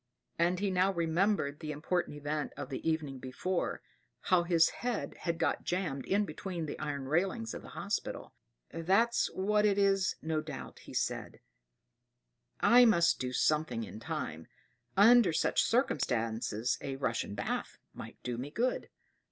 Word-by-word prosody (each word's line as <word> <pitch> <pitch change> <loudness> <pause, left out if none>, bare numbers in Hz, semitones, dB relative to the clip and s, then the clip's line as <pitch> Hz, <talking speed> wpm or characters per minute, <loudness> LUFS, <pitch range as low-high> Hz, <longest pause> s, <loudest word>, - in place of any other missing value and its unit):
And 175 +2 +2
he 200 -1 0
now 185 +1 +3
remembered 170 -3 +1
the 155 -2 -5
important 150 +1 -2
event 145 +1 -3
of - - -5
the 135 +4 -2
evening 150 -4 -2
before, 150 +9 -3 0.4
how 185 -2 +3
his 170 -1 +4
head 245 -1 -3
had 170 -1 -3
got 165 - 0
jammed 170 -7 -2
in 205 +2 +2
between 180 -5 -5
the 150 - -6
iron 145 -3 -3
railings 155 -7 0
of - - -6
the - - -12
hospital. - - -3 0.4
"That's 195 +8 +2
what 210 +2 +2
it 205 -2 +3
is, 195 -1 +3
no 160 -1 -1
doubt," - - -8
said - - -2
he. - - -20 1.2
"I 245 +1 +7
must 170 -8 +4
do 125 0 -2
something 140 -4 +1
in 110 - -8
time: 115 - -5 0.5
under 225 0 +7
such 160 - +2
circumstances 115 - 0
a 135 - -4
Russian 115 -6 -2
bath 105 - -3 0.2
might - - -9
do 120 -1 -3
me 135 +3 -4
good. 240 +11 -1
165 Hz, 150 wpm, -32 LUFS, 140-195 Hz, 1.2 s, I